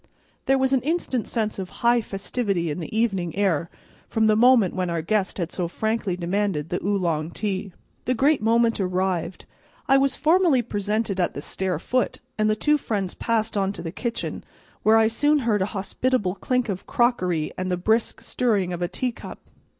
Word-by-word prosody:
There 270 - +4
was 265 0 +1
an 265 - +3
instant 285 -5 -1
sense 215 -3 -2
of 185 -1 -4 0.2
high 240 0 +5
festivity 195 -4 -2
in 150 - -4
the 175 +6 -5
evening 195 -8 0
air 170 -5 +1 0.4
from 220 -1 +2
the 215 -1 +4
moment 230 -4 +5
when 185 -1 -1
our 170 -1 -2
guest 200 +2 0
had 175 -3 -3
so 180 -2 -2
frankly 220 0 -1
demanded 180 -3 -1
the 175 - -3
Oolong 170 -6 0
tea. 195 0 -3 0.3
The 255 - +1
great 280 +2 +3
moment 230 +1 +2
arrived. 185 -2 -1 0.4
I 270 0 +5
was 275 -1 +2
formally 315 -3 +3
presented 210 -2 -2
at 175 - 0
the - - -4
stair 190 +4 -2
foot, 255 0 -1 0.2
and 215 0 +1
the 215 - +2
two 300 +7 +2
friends 200 -7 -2
passed 225 -1 -1
on 195 -1 0
to - - -7
the 165 - -4
kitchen, 235 +5 -4 0.4
where 220 +1 +5
I 225 - +5
soon 290 +7 +2
heard 210 -4 +2
a 190 - +1
hospitable 205 0 0
clink 250 +4 -1
of 190 -3 -4
crockery 180 -10 +1
and 185 0 -3
the 180 - +1
brisk 220 +6 0
stirring 205 -8 0
of 175 - -5
a 175 - +1
tea 250 +7 -2
cup. - - -10
210 Hz, 190 wpm, -24 LUFS, 185-235 Hz, 0.4 s, high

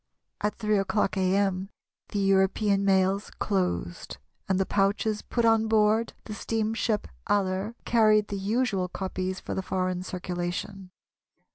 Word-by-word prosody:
At 210 - 0
3 210 -1 +1
o'clock 195 0 0
a.m. 190 0 +1 0.4
the - - -4
European 195 +1 +2
mails 195 +1 +2
closed, 90 - -2 0.3
and 190 0 +2
the 190 - +2
pouches 205 +2 +1
put 235 -1 -1
on 225 -1 +4
board 220 +1 +3
the 215 - -7
steamship 220 0 -1 0.2
Aller 195 +2 0
carried 215 -3 +4
the 200 - -3
usual 205 -2 0
copies 185 0 -3
for - - -5
the - - -1
foreign 185 -1 -1
circulation. 185 +1 -4
195 Hz, 130 wpm, -27 LUFS, 185-215 Hz, 0.4 s, on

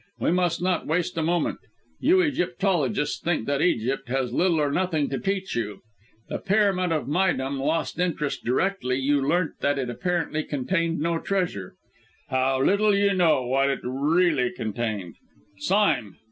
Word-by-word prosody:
"We - - +1
must 175 -1 +1
not 185 -1 0
waste 180 +3 0
a 165 - -1
moment. 170 +2 0 0.4
You 355 +8 +4
Egyptologists 180 - 0
think 165 -9 -1
that 140 0 0
Egypt 135 -5 0
has 130 -2 -1
little 170 +1 +2
or 145 -1 +1
nothing 160 -4 0
to 135 - -2
teach 195 -1 -2
you; 105 -4 -3 0.5
the - - -4
Pyramid 195 -3 +2
of 155 -2 0
Méydûm 140 -4 0
lost 155 +4 -1
interest 165 -5 -1
directly 130 +1 0
you 140 +1 +1
learnt 165 +4 0
that 145 0 +1
apparently 155 +5 -2
it 155 - -5
contained 165 +4 -1
no 165 +1 0
treasure. 175 - -2 0.5
How, 130 0 +1
little 205 +4 +3
you 200 0 +3
know 165 -8 +3
what 135 +2 +2
it 135 - -2
really 145 +1 +2
contained, 110 -6 -4 0.4
Sime! 180 - +1
155 Hz, 155 wpm, -25 LUFS, 135-180 Hz, 0.5 s, You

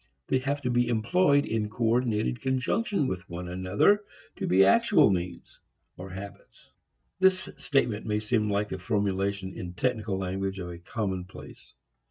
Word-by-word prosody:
They 130 - +3
have 140 +2 -2
to 125 - 0
be 120 0 +2
employed 140 +6 +3
in 110 -2 -1
coordinated 115 0 0
conjunction 135 - 0
with 95 -4 -4
one 85 +1 -6
another 95 - +2 0.3
to - - -3
be 95 +1 +5
actual 100 - +5
means, 90 -2 -4 0.4
or 95 +1 -9
habits. 95 +2 -11 0.5
This 190 0 +3
statement 120 -7 0
may 105 0 +1
seem 110 0 0
like 100 +1 0
the 95 - -5
formulation 100 -1 -1
in 90 -1 -7
technical 110 -4 -1
language 95 +1 -3
of 90 -2 -5
a 85 - -9
common 95 -1 -3
place. - - -13
105 Hz, 155 wpm, -28 LUFS, 95-125 Hz, 0.5 s, be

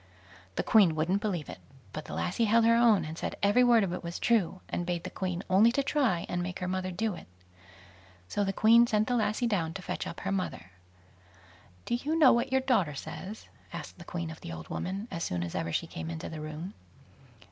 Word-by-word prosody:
The - - 0
Queen 195 -8 +5
wouldn't 175 +6 +1
believe 180 -9 -2
it, - - -8 0.3
but 155 - -5
the - - -6
lassie 225 +6 0
held 225 +1 +4
her 230 - +6
own, 225 -7 +4
and 155 +1 -6
said - - -3
every 205 +5 +5
word 235 -3 +5
of 180 -3 -2
it 180 - -5
was 170 0 -5
true, 200 -6 +1
and 175 - -2
bade 175 -1 -2
the - - -6
Queen 185 -1 -3
only 200 +5 +5
to 280 - +1
try 260 - +1
and 175 - -2
make 180 +1 -4
her 180 - -3
mother 185 0 -2
do 205 +4 -1
it. - - -10 1.0
So 205 - -1
the 195 - 0
Queen 230 +4 +6
sent 215 -1 +1
the 250 - +1
lassie 220 +1 +1
down 175 -8 0
to 195 - -5
fetch - - -4
up 170 - -7
her 195 - -2
mother. 185 - -3 1.1
"Do - - -2
you 290 +7 0
know 295 -5 +7
what 240 +2 0
your 265 0 +3
daughter 210 - +1
says?" 185 +8 -7 0.3
asked - - -8
the - - -9
Queen 170 -2 -4
of 160 - -11
the - - -7
old 80 -1 -8
woman, 195 +4 -4
as 170 -3 -3
soon 90 -1 -2
as 85 - -5
ever 85 - -2
she - - 0
came 80 0 -6
into 80 -1 -5
the 160 -1 -7
room. 155 +5 -6
190 Hz, 230 wpm, -29 LUFS, 170-225 Hz, 1.1 s, know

